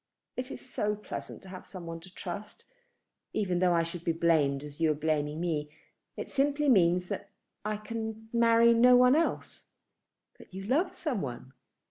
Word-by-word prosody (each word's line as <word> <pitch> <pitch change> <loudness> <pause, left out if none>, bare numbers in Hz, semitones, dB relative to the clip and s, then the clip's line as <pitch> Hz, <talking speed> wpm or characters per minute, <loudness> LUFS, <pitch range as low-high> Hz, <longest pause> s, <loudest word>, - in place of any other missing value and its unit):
It 255 +1 -4
is - - -9
so 210 -4 -1
pleasant 210 - -7
to 190 - -12
have 185 -1 -8
some 185 -3 -9
one 165 0 -6
to 180 +3 -15
trust, 190 +3 -7 0.7
even 185 -4 0
though 180 -1 +4
I 165 - +3
should 170 0 -6
be 170 - +1
blamed 155 -4 +2
as 150 +1 -9
you 160 - +4
are - - 0
blaming 150 0 -1
me. 155 -4 -1 0.5
It - - -4
simply 285 +1 +1
means 180 -5 +4
that - - -4 0.3
I 215 0 -1
can 220 0 -6
marry 235 0 +5
no 250 +2 +7
one 250 +2 +6
else." 330 +2 -1 0.7
"But - - -14
you 195 - -5
love 285 - +1
some 270 - -2
one?" 130 0 -6
190 Hz, 180 wpm, -30 LUFS, 165-230 Hz, 0.7 s, no